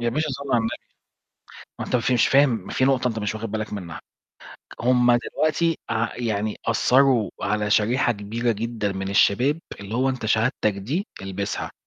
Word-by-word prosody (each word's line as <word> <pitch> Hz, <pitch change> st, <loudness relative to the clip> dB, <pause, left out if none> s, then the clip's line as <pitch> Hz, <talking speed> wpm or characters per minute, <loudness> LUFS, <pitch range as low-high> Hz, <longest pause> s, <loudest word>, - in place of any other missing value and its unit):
يا 120 Hz, -, 0 dB
باشا، 155 Hz, +6 st, -1 dB
صلِّ 140 Hz, +1 st, -5 dB
على 120 Hz, -, +5 dB
النبي، 115 Hz, 0 st, -1 dB, 1.1 s
ما -, -, -3 dB
أنت -, -, -1 dB
أنت 120 Hz, +1 st, +1 dB
مش 125 Hz, -2 st, +4 dB
فاهم 140 Hz, +1 st, +5 dB, 0.2 s
ما -, -, -7 dB
فيه 130 Hz, -, +2 dB
نقطة 130 Hz, -2 st, +2 dB
أنت 115 Hz, -2 st, -3 dB
مش 105 Hz, 0 st, -2 dB
واخد 110 Hz, -1 st, -5 dB
بالك 110 Hz, -1 st, -3 dB
منها، 90 Hz, -5 st, -6 dB, 0.8 s
هم 125 Hz, 0 st, +4 dB
دلوقتي 155 Hz, +6 st, 0 dB
ع 115 Hz, 0 st, -1 dB
يعني 110 Hz, -3 st, -2 dB
أثّروا 125 Hz, -1 st, +3 dB
على 105 Hz, +1 st, 0 dB
شريحة 115 Hz, +4 st, +2 dB
كبيرة 115 Hz, +3 st, -2 dB
جدًا 110 Hz, -1 st, -2 dB
من 95 Hz, 0 st, -4 dB
الشباب، 125 Hz, +9 st, +3 dB, 0.2 s
اللي 100 Hz, +2 st, -6 dB
هو 130 Hz, +2 st, +2 dB
أنت 130 Hz, -4 st, -4 dB
شهادتك 110 Hz, 0 st, +1 dB
دي 135 Hz, -, -3 dB
البسها، 100 Hz, +1 st, -4 dB
115 Hz, 175 wpm, -23 LUFS, 105-130 Hz, 1.1 s, على